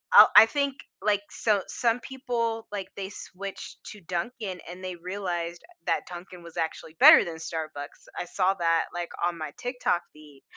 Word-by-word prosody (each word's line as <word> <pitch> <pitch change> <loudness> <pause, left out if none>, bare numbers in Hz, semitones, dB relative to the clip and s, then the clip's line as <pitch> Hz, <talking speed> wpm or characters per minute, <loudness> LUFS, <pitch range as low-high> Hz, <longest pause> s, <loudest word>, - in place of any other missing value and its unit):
I'll - - +11
I 210 +1 +12
think, 280 +2 -1 0.3
like 205 -1 +2
so, 210 -3 +1
some 235 0 +1
people, 240 -4 -3
like, 200 -2 -4
they 195 -1 -5
switched 195 0 -8
to 210 - -9
Dunkin' 185 +1 -4
and 180 +1 -9
they 185 -1 -4
realized 175 -1 -4 0.2
that - - +1
Dunkin' 175 0 -9
was 170 0 -12
actually 160 -1 -3
better - - +10
than 165 -2 -5
Starbucks. 155 -3 -6
I - - -2
saw 190 +2 +1
that, 165 -3 +2
like, 175 -1 -3 0.2
on 175 -1 -1
my 155 - -4
TikTok 245 -8 0
feed. 150 -3 -16
185 Hz, 170 wpm, -27 LUFS, 170-215 Hz, 0.3 s, I